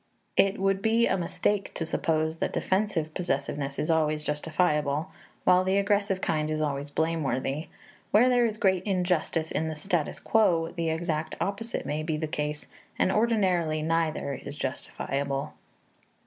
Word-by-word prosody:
It 195 +1 +3
would 195 0 +1
be 230 +2 +3
a - - +2
mistake 195 +3 -1
to 165 - -2
suppose 160 -1 0
that - - -2
defensive 190 -6 0
possessiveness 140 -4 -2
is 155 - 0
always 155 -1 +1
justifiable, 150 +1 0 0.3
while 180 0 +5
the 190 +1 +2
aggressive 200 -1 +1
kind 155 -1 0
is 155 0 -1
always 145 -1 -2
blameworthy; 150 -2 -1 0.4
where 230 +4 +5
there 245 -2 +4
is 215 -1 -4
great 190 -4 +3
injustice 180 -4 0
in 160 - -1
the 160 - -3
status 165 0 -1
quo, 170 -7 +2
the 165 -2 -1
exact 160 -1 -2
opposite 225 +4 -3
may 150 +1 -2
be 155 0 -1
the 155 - -2
case, 150 0 -3 0.3
and 185 - +3
ordinarily 185 -8 +2
neither 160 -3 0
is - - -7
justifiable. 140 0 -3
165 Hz, 150 wpm, -28 LUFS, 155-195 Hz, 0.4 s, while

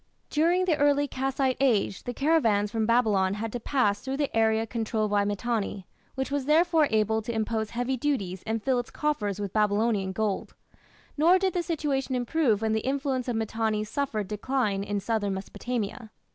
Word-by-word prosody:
During 345 +4 +2
the 330 -5 +2
early 290 0 +3
Kassite 265 0 -1
Age 225 -8 +1
the 245 - -3
caravans 230 -10 +2
from 220 -1 0
Babylon 210 -5 +2
had 220 +1 -4
to 245 - -2
pass 220 -5 +1
through 265 +1 -3
the 285 -4 -2
area 220 0 +3
controlled 220 -2 -2
by 205 -1 +2
Mitanni, 205 -1 -2 0.3
which 265 +1 -3
was 285 -2 -1
therefore 320 0 +4
able 220 0 +1
to 220 - -4
impose 220 -1 -1
heavy 245 +3 -2
duties 205 -10 -2
and 220 -1 -2
fill 260 -2 +2
its 245 - -5
coffers 210 -10 -2
with 200 -2 -4
Babylonian 210 -2 +1
gold. 210 0 -2 0.6
Nor 335 +5 +5
did 375 -1 0
the 355 - 0
situation 285 -6 -1
improve 245 -4 +1
when 220 0 +1
the 220 - +2
influence 265 +1 -1
of 245 - -1
Mitanni 220 -1 -1
suffered 215 -3 -2
decline 210 -1 -1
in 205 0 -2
southern 205 -1 -1
Mesopotamia. 220 +3 -4
230 Hz, 175 wpm, -27 LUFS, 210-275 Hz, 0.6 s, Nor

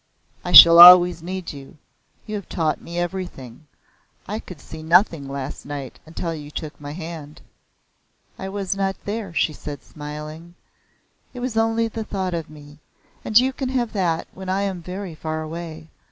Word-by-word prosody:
"I 180 - -4
shall 170 0 +11
always 175 0 +10
need 185 0 -6
you. 140 +1 -12 0.5
You 215 - -7
have 205 -2 -6
taught 160 -4 -1
me 170 +1 -8
everything. 175 -7 -6 0.6
I 210 +2 -4
could 180 -8 -11
see 160 +3 -11
nothing 165 -3 +2
last 140 0 -6
night 140 -3 -7
until 165 +1 -4
you 150 -2 -8
took 150 -1 -8
my 145 0 -7
hand." 160 -3 -8 1.0
"I 190 - -5
was 195 -1 -3
not 195 -1 -1
there," 205 -2 -4
she 165 -1 0
said 145 -1 -8
smiling. 155 +3 -9 0.8
"It - - -6
was 245 -2 -4
only 225 0 +1
the 225 0 -5
thought 190 -4 -4
of 165 -2 -4
me, 145 -1 -14 0.4
and 215 - +2
you 260 +2 +4
can 260 -1 -4
have 245 -3 -2
that 175 -5 -1
when 190 0 -8
I 195 +2 0
am 190 -3 -3
very 185 +1 -7
far 155 0 -5
away. 160 0 -8
170 Hz, 170 wpm, -22 LUFS, 155-195 Hz, 1.0 s, shall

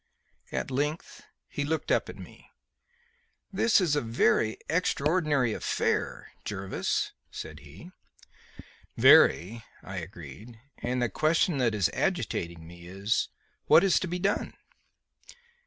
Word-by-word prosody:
At - - -3
length 150 +5 -3 0.3
he 145 - -3
looked 155 +1 -2
up - - +1
at - - -9
me. - - -13 1.0
"This 220 +4 +4
is 170 -6 +1
a 145 - +1
very 115 -1 +1
extraordinary 150 -6 +1
affair, - - -2
Jervis," 95 -2 -2 0.2
he - - -19
said. - - -8 1.4
"Very," 110 +7 +5 0.2
I 95 0 -7
agreed; 90 - -9 0.2
"and 125 0 -1
the 120 - 0
question 155 - +1
that 115 -4 +1
is 100 -5 +1
agitating 85 -1 -2
me 85 +1 -12
is, 100 +4 -1 0.4
what 170 - +7
is 195 -3 +4
to 185 - -3
be 175 +1 -3
done?" 200 +3 -1
125 Hz, 125 wpm, -28 LUFS, 95-160 Hz, 1.4 s, what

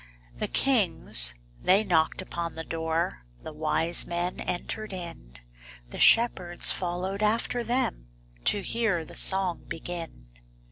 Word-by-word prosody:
The - - -1
kings 165 - +2 0.3
they 195 +3 +4
knocked 175 -2 +1
upon 170 -2 -5
the 160 - -5
door, 165 - -2 0.2
The - - -8
wise 160 +2 +1
men 175 +1 -2
entered 215 +4 -4
in, 165 - -8 0.5
The - - -7
shepherds 185 -7 +4
followed 185 +3 -3
after 230 +3 +1
them 235 - -1 0.4
To 205 - +2
hear 215 -8 0
the - - -12
song 190 -3 +3
begin. 165 - -7
175 Hz, 125 wpm, -27 LUFS, 160-200 Hz, 0.5 s, they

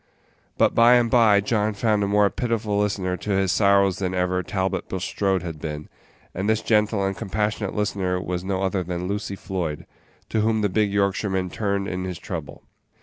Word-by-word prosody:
But - - +3
by 120 +1 +6
and 120 -2 +2
by 110 -5 +5
John 105 0 0
found 105 0 +1
a - - 0
more 105 0 +4
pitiful 110 -4 -1
listener 100 -3 0
to 105 - -8
his 95 -2 +2
sorrows 100 -2 +3
than 95 -1 -2
ever 90 0 0
Talbot 95 +1 -2
Bulstrode 95 0 -1
had 80 -3 -6
been, 75 -1 -5 0.4
and 95 +4 -2
this 110 0 +1
gentle 105 -2 +2
and 95 0 -1
compassionate 105 0 -2
listener 95 -3 -1
was 90 -1 -3
no 95 0 -2
other 95 0 0
than 90 0 -4
Lucy 100 0 -3
Floyd, 90 -6 -4 0.4
to 110 - 0
whom 110 0 +1
the 105 - +1
big 105 +1 +1
Yorkshireman 95 -2 0
turned 100 -2 -1
in 90 -1 -3
his 90 -2 -5
trouble. - - -7
100 Hz, 185 wpm, -23 LUFS, 95-105 Hz, 0.4 s, by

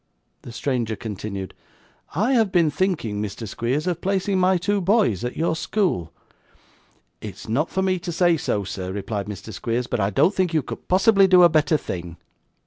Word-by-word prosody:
The - - -10
stranger 120 -3 -2
continued. 100 -2 -6 0.6
'I 215 - +1
have 225 -6 +3
been 170 -5 +3
thinking, 145 - -1
Mr. 105 +2 -5
Squeers, 125 - -2
of 175 -2 -2
placing 195 0 0
my 185 0 +3
two 200 +3 0
boys 190 - +2
at 125 - -4
your 160 0 +1
school.' 160 - -1 1.1
'It - - -7
is - - -12
not 135 +9 0
for 190 - -1
me 185 -1 +1
to 175 - -5
say 175 0 +3
so, 140 -10 -1
sir,' 95 -1 -5
replied 100 +1 -4
Mr. 105 +1 -8
Squeers, 120 +2 -2
'but 120 - -2
I 100 0 +1
don't 150 - +3
think 180 -4 0
you 155 - +2
could - - -8
possibly 195 +1 +5
do 180 -1 +6
a 175 - +8
better 155 -1 +2
thing. 85 - -6
155 Hz, 190 wpm, -23 LUFS, -, 1.1 s, a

